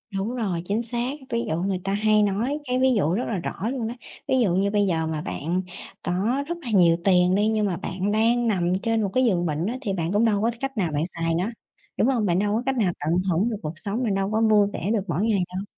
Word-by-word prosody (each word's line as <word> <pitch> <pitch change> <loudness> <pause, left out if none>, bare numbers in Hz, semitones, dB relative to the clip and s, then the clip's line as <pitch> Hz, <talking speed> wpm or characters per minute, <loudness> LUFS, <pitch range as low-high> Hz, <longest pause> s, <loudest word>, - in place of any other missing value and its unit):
Đúng 210 +6 -2
rồi, 195 -8 -2
chính 210 +5 -1
xác. 240 +2 -2 0.2
Ví 235 - 0
dụ 160 - 0
người 190 0 -1
ta 195 - -1
hay 215 +1 +3
nói 220 +9 0
cái 250 -1 0
ví 260 - +4
dụ 170 -3 +1
rất 235 - 0
là 215 - -2
rõ 195 +5 -3
luôn 245 -5 -3
đó, 230 - -4 0.3
ví 260 - +2
dụ 180 -5 +1
như 200 +2 +1
bây 205 -1 +2
giờ 160 -3 0
mà 155 -1 -3
bạn 170 +6 -2 0.4
có 220 +10 0
rất 345 +1 -3
là 255 - -2
nhiều 170 -4 +5
tiền 180 -1 +4
đi, 210 +1 +2
nhưng 215 -1 +1
mà 185 -4 -1
bạn 195 +2 -3
đang 230 +3 +2
nằm 180 -5 +1
trên 225 -1 +1
một 200 - 0
cái 255 0 +3
giường 180 -6 +1
bệnh 155 +1 -1
á 235 - -2
thì 205 -6 -2
bạn 170 -2 -2
cũng 215 +3 +3
đâu 205 -3 +2
có 230 +2 +2
cách 270 -1 -4
nào 180 -6 0
bạn 145 +2 0
xài 165 0 0
nó, 185 +6 0 0.5
đúng - - +3
hông? 245 -5 +1
Bạn 180 -2 +2
đâu 205 +1 +1
có 235 - -1
cách 270 -1 0
nào 200 -6 +2
tận 160 +4 0
hưởng 195 +8 +1
được 220 - -3
cuộc 155 0 -4
sống, 210 +7 -2
bạn 215 -5 0
đâu 195 +1 -1
có 220 - +1
vui 215 -2 +4
vẻ 190 - -3
được 220 - +1
mỗi 170 +1 -1
ngày 220 -3 +2 0.2
đâu. 190 - -2
205 Hz, 280 wpm, -24 LUFS, 180-230 Hz, 0.5 s, nhiều